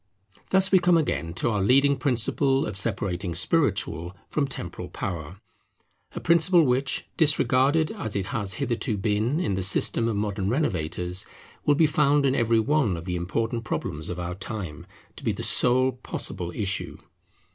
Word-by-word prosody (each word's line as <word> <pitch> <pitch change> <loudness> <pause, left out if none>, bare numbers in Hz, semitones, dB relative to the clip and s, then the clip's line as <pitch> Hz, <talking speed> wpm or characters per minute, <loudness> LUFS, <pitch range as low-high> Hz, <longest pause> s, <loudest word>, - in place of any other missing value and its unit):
Thus 190 0 +3
we 190 - +6
come 175 -1 +4
again 85 - -1
to 120 - 0
our 105 -2 0
leading 135 +7 +4
principle 135 +2 +1
of - - -5
separating 95 -3 -1
spiritual 90 - 0
from 145 -2 -1
temporal 90 -7 -6
power; 85 0 -6 0.8
a - - -3
principle 170 +1 +4
which, 130 +1 0
disregarded 150 0 +3
as 190 - -5
it 100 -2 -1
has 100 -1 -3
hitherto 120 -3 -1
been 110 - 0
in 105 - -1
the 95 - -1
system 105 +4 +3
of 115 - -1
modern 100 -2 -2
renovators, 90 - -1 0.4
will 145 - +5
be 160 - +4
found 145 -1 +2
in 130 - +2
every 115 -3 +2
one 125 - +1
of 85 - -8
the 90 -1 -3
important 115 +7 -2
problems 80 -7 -4
of 90 0 -5
our 90 0 -4
time 95 -5 -7 0.3
to - - -10
be - - 0
the - - -6
sole 130 +1 +3
possible 90 -7 -5
issue. 100 -3 -2
115 Hz, 165 wpm, -25 LUFS, 95-140 Hz, 0.8 s, we